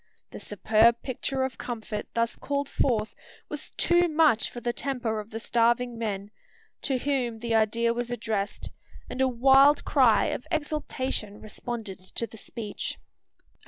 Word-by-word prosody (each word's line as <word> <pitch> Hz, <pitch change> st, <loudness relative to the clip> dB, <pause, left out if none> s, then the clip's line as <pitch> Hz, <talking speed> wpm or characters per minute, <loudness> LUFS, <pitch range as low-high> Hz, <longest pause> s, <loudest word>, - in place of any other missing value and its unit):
The -, -, -8 dB
superb 220 Hz, +3 st, +3 dB
picture 265 Hz, +1 st, -2 dB
of 260 Hz, 0 st, -4 dB
comfort 220 Hz, -3 st, -5 dB
thus 230 Hz, 0 st, +1 dB
called 280 Hz, 0 st, -2 dB
forth 225 Hz, -6 st, 0 dB, 0.4 s
was -, -, -5 dB
too 350 Hz, 0 st, +3 dB
much 310 Hz, -7 st, +3 dB
for 240 Hz, -, -7 dB
the 240 Hz, 0 st, -2 dB
temper 240 Hz, -5 st, -2 dB
of 210 Hz, +1 st, -8 dB
the 225 Hz, -, -5 dB
starving 235 Hz, +1 st, +2 dB
men, 205 Hz, -3 st, -4 dB, 0.5 s
to 270 Hz, -2 st, 0 dB
whom 250 Hz, -4 st, -1 dB
the 230 Hz, 0 st, -2 dB
idea 230 Hz, +1 st, +2 dB
was 240 Hz, 0 st, -3 dB
addressed; 215 Hz, -4 st, -3 dB, 0.4 s
and 255 Hz, -, -2 dB
a 265 Hz, -, +5 dB
wild 270 Hz, +4 st, +5 dB
cry 250 Hz, -7 st, +4 dB
of -, -, -4 dB
exultation 280 Hz, -, -2 dB
responded 215 Hz, -2 st, -6 dB, 0.2 s
to 230 Hz, -, -1 dB
the 225 Hz, -, -13 dB
speech. 215 Hz, 0 st, -5 dB
235 Hz, 150 wpm, -27 LUFS, 220-265 Hz, 0.5 s, a